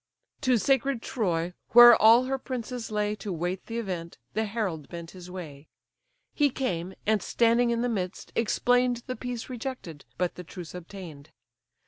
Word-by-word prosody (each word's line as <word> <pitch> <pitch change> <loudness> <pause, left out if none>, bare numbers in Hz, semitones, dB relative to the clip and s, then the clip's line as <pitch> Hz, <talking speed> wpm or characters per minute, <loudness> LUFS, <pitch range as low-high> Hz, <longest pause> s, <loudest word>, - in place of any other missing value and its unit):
To 255 -4 +3
sacred 270 0 +1
Troy, 175 -6 -1 0.2
where 240 0 +11
all 225 +3 +6
her 265 +1 -2
princes 250 -2 -5
lay 210 -1 0
To 200 0 -5
wait 180 +2 -3
the 230 - -4
event, 180 -7 -4 0.2
the 220 +1 0
herald 200 -9 -3
bent 170 -1 -8
his 180 -1 -11
way. 160 -6 -9 0.7
He 290 -1 +3
came, 185 -9 -3
and 215 -1 +2
standing 235 +3 +2
in 235 0 0
the - - +1
midst, 190 -5 -4
explain'd 245 +1 +2
The 255 - -4
peace 245 0 -5
rejected, 245 - -6
but 180 0 0
the 180 - -9
truce 175 -1 -9
obtain'd. 175 -5 -10
215 Hz, 160 wpm, -27 LUFS, 180-245 Hz, 0.7 s, where